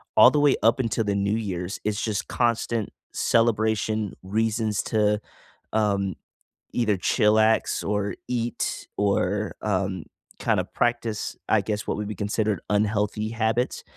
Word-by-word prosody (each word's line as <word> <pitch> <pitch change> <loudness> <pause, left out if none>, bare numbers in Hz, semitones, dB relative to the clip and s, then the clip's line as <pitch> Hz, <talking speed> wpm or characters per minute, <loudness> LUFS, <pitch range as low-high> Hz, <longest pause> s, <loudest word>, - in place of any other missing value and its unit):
all - - +8
the 150 - +2
way 145 -2 +5
up 115 +4 +4
until 115 -2 0
the 100 -1 0
New 100 +2 +1
Year's, 95 -4 -3
it's 105 0 -1
just 105 -2 -2
constant 115 -2 0 0.2
celebration 110 -2 +1
reasons 110 +1 0
to, 105 -1 +2 0.5
um, 100 -3 +1 0.6
either 110 -4 +1
chillax, 110 +4 +2
or 105 0 -1
eat, 120 -1 -2
or, 100 +1 0
um, 95 -3 -1 0.4
kinda - - +1
practice, 120 -3 -1
I - - +5
guess, 105 -1 -3
what - - -2
would 105 - -3
be 105 - -5
considered 105 0 -1
unhealthy 105 +1 0
habits, 115 +2 -1
105 Hz, 135 wpm, -25 LUFS, 105-115 Hz, 0.6 s, all